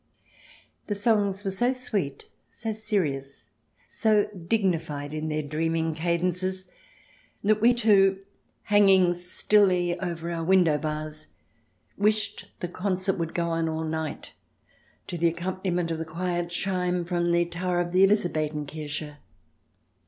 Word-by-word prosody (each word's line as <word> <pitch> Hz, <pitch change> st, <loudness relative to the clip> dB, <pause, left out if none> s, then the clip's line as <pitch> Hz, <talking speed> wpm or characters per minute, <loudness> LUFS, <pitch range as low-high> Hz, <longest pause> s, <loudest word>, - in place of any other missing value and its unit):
The 205 Hz, -, -1 dB
songs 205 Hz, -2 st, +1 dB
were 195 Hz, -, 0 dB
so 240 Hz, +7 st, +1 dB
sweet, 200 Hz, -, -3 dB, 0.3 s
so 225 Hz, -1 st, -4 dB
serious, 150 Hz, -11 st, -2 dB, 0.4 s
so 215 Hz, -2 st, +2 dB
dignified 165 Hz, -6 st, -1 dB
in 155 Hz, 0 st, -3 dB
their 155 Hz, 0 st, -1 dB
dreaming 160 Hz, +2 st, -1 dB
cadences 180 Hz, +3 st, -1 dB, 0.8 s
that 215 Hz, +1 st, +3 dB
we 240 Hz, +2 st, +5 dB
two, 195 Hz, -5 st, +4 dB, 0.5 s
hanging 195 Hz, -4 st, +5 dB
stilly 180 Hz, 0 st, +2 dB
over 170 Hz, -2 st, -4 dB
our 165 Hz, -1 st, -3 dB
window 170 Hz, -4 st, +4 dB
bars, 155 Hz, 0 st, -4 dB, 0.7 s
wished 210 Hz, 0 st, +1 dB
the 175 Hz, -, -1 dB
concert 185 Hz, +1 st, -1 dB
would 165 Hz, -1 st, -3 dB
go 170 Hz, -1 st, 0 dB
on 165 Hz, -1 st, 0 dB
all 160 Hz, 0 st, -2 dB
night, 160 Hz, -1 st, -4 dB, 0.7 s
to 175 Hz, -2 st, -5 dB
the 170 Hz, -, +4 dB
accompaniment 175 Hz, 0 st, -2 dB
of 160 Hz, -, -2 dB
the 160 Hz, -, -3 dB
quiet 175 Hz, +1 st, -2 dB
chime 180 Hz, 0 st, -1 dB
from 175 Hz, -1 st, 0 dB
the 170 Hz, 0 st, +3 dB
tower 175 Hz, +1 st, -2 dB
of 175 Hz, 0 st, -1 dB
the 185 Hz, +2 st, +5 dB
Elizabethen 155 Hz, -7 st, +1 dB
Kirche. 150 Hz, 0 st, -6 dB
175 Hz, 130 wpm, -26 LUFS, 160-195 Hz, 0.8 s, we